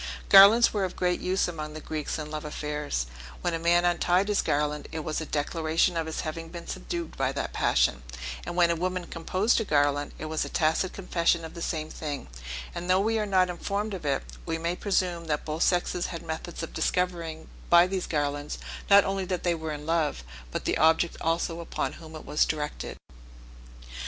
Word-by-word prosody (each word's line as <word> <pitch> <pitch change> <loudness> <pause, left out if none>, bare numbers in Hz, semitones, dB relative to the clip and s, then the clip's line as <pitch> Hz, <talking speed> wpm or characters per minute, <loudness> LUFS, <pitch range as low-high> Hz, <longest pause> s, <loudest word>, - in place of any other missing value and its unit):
Garlands 210 +5 +9
were 205 -2 0
of 185 - -3
great 180 -1 +1
use 185 +1 +1
among 155 -3 -5
the - - -5
Greeks 155 -1 -3
in 150 -1 -6
love 155 -1 -4
affairs; 150 - -3 0.4
when 175 - 0
a 165 - -1
man 175 +1 +3
untied 180 +3 +2
his 205 - +3
garland, 150 0 -1
it 160 - -3
was 155 +1 -2
a 160 - -5
declaration 160 +3 +1
of 165 -1 -1
his 160 - -3
having 165 +1 -5
been 170 0 -8
subdued 340 -1 -5
by 135 -1 +1
that - - -4
passion; - - +2 0.4
and - - -5
when 175 -1 +4
a - - +1
woman 180 +1 -2
composed 185 +8 +1
a - - 0
garland, 145 -4 +1
it - - -6
was 155 0 -1
a - - -5
tacit 160 +3 +1
confession 170 -3 +1
of 160 - -9
the 170 - -8
same 155 -2 -2
thing: 145 -3 -5 0.5
and 175 - -5
though 185 +1 +5
we 220 +2 +1
are 210 - -1
not 185 -2 +4
informed 200 +4 -3
of 185 - -5
it, 140 -2 0 0.2
we 165 -1 -2
may 170 +2 -1
presume 180 -4 0
that 150 -2 -1
both 155 +1 -3
sexes 180 -1 +1
had 170 -1 -6
methods 165 +1 -5
of 165 - -6
discovering 170 -3 -1 0.2
by 175 0 +8
these 185 0 -2
garlands, 145 -1 -2 0.3
not 200 0 +8
only 195 0 -1
that 180 -1 -3
they 175 - +2
were 160 -1 -4
in 150 0 -6
love, 160 - 0 0.3
but - - -4
the - - +1
object 160 +2 +4
also 165 +1 0
upon 170 - -3
whom 160 -1 -10
it 155 - -9
was 150 - +2
directed. 150 -1 -3
165 Hz, 205 wpm, -27 LUFS, 155-180 Hz, 0.5 s, Garlands